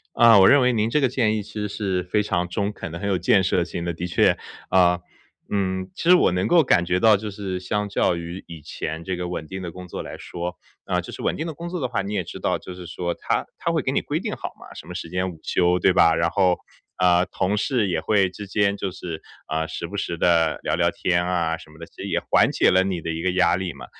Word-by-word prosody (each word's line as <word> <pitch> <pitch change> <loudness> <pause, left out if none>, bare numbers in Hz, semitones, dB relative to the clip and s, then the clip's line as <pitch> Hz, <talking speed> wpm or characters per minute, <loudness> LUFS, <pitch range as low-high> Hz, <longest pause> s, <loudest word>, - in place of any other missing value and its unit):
啊， 115 -3 +7
我 95 - +8
认 140 - +6
为 125 0 +3
您 110 -1 +1
这 150 - +2
个 135 - +3
建 115 -4 +1
议 105 - -2
其 105 +1 -14
实 105 -1 -3
是 95 -3 -2
非 100 +4 0
常 90 -3 -1
中 100 +3 -2
肯 80 - -7
的、 85 - -6
很 100 +2 -3
有 95 - +2
建 95 +2 +3
设 90 -1 +2
性 85 0 -4
的。 85 - -1
的 90 +2 -4
确 85 - +3 0.3
啊， 90 -1 +4 0.5
嗯， 95 -2 -1
其 170 - -3
实 180 - +9
我 135 - +3
能 90 +1 0
够 170 -2 +5
感 90 -8 +3
觉 90 +1 +1
到 110 +2 +6
就 105 +1 -5
是 95 -2 -4
相 105 +3 -2
较 95 -3 +1
于 85 +2 -7
以 85 -2 -9
前 80 +2 -5
这 95 0 -2
个 90 0 -4
稳 85 -3 -5
定 95 +2 -6
的 85 - -5
工 90 +1 -10
作 - - -6
来 - - -8
说 85 0 -5 0.3
啊， - - 0
就 - - -9
是 - - -8
稳 - - 0
定 160 - -3
的 160 - -5
工 170 +3 -7
作 180 -2 -4
的 130 - 0
话， 120 -3 -2
你 100 +2 -5
也 95 -4 -1
知 - - -9
道， - - 0
就 90 - -9
是 90 -1 -9
说 85 0 -3
它 - - -1
它 - - -2
会 - - +1
给 - - -1
你 - - +2
规 - - -2
定 - - -4
好 - - -6
嘛， - - -13
什 - - -10
么 - - -7
时 - - -6
间 90 +2 -1
午 80 - -12
休， 90 0 +2
对 90 - +4
吧？ 80 -2 +5
然 85 0 +1
后， 95 -3 +2 0.4
呃， 90 -1 +4
同 100 +3 -1
事 110 -1 +1
也 85 -3 0
会 100 +3 +2
之 100 +3 -8
间 100 0 +1
就 100 - -3
是， 90 -3 -7 0.3
呃， 80 +1 -1
时 - - -5
不 - - -7
时 85 - -2
地 85 -2 +3
聊 - - 0
聊 - - +2
天 90 -1 0
啊 85 -2 0
什 80 - -15
么 80 - -17
的， 85 - -8
其 - - -17
实 - - -4
也 - - 0
缓 - - +5
解 - - +3
了 95 +1 +4
你 95 -3 -2
的 85 - -3
一 80 0 -3
个 95 - +1
压 90 -1 +3
力 95 -2 -3
嘛。 70 - -10
90 Hz, 305 characters per minute, -23 LUFS, 85-105 Hz, 0.5 s, 实